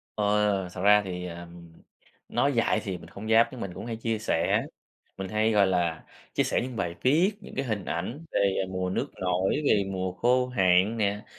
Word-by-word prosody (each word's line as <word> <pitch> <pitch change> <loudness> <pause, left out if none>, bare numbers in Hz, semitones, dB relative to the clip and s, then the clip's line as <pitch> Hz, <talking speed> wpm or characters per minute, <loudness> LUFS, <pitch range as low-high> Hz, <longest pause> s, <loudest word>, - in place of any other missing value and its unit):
Ờ, 105 -2 +1
thật 90 - -6
ra 105 +1 +6
thì, 90 -1 -5
ờ, 85 0 -7 0.8
nói 140 - +1
dại 115 -2 +2
thì 95 -3 -4
mình 85 -1 -13
hông 105 +2 -7
dám 115 +1 +6
nhưng 125 - -8
mình 95 -2 -5
cũng - - -8
hay 115 -1 -4
chia 115 -1 -2
sẻ, 85 -6 +1 0.5
mình 95 -1 -5
hay, 110 +1 +1
gọi 100 -2 +4
là, 85 -3 0 0.3
chia - - +2
sẻ - - 0
những 125 0 -5
bài 85 -5 -2
viết, 165 +10 +3
những - - -11
cái 135 - -1
hình 105 -6 -3
ảnh 115 - -4
về 95 -1 +1
mùa 95 -1 -2
nước 90 - -1
nổi, 90 +9 +1
về 105 -7 +4
mùa 95 -1 -2
khô 125 +5 +2
hạn 95 -2 +3
nè, 105 0 -1
100 Hz, 205 wpm, -27 LUFS, 90-115 Hz, 0.8 s, ra